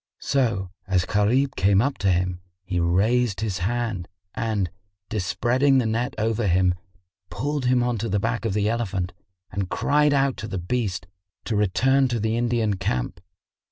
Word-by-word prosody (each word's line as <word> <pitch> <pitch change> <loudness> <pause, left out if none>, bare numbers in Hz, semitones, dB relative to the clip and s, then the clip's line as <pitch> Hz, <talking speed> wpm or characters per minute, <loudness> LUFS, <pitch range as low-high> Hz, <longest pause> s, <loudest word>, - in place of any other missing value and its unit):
So, 115 -9 0 0.2
as 95 -2 +2
Gharib 120 +6 +2
came 100 0 +3
up 135 +5 0
to 100 -2 +2
him, 90 0 0 0.2
he 90 -2 -1
raised 100 +6 +2
his 100 -4 -2
hand 110 -2 -2 0.3
and, 105 -6 -1 0.4
despreading 120 +8 +2
the 125 - +2
net 120 +4 -1
over 110 0 0
him, 90 0 +3 0.6
pulled 145 +4 -2
him 125 -1 +3
on 120 -2 0
to 115 +2 -2
the 105 - +1
back 115 +3 -1
of 110 -4 -1
the 105 0 +1
elephant 100 -6 -1 0.4
and 95 -1 -3
cried 150 +1 +2
out 140 -2 +2
to 110 - -5
the 95 - -4
beast 95 0 -2 0.4
to 110 - -1
return 130 +7 +3
to 120 -2 -1
the 110 +1 0
Indian 115 -4 +1
camp. 65 -11 -2
110 Hz, 165 wpm, -24 LUFS, 95-120 Hz, 0.6 s, came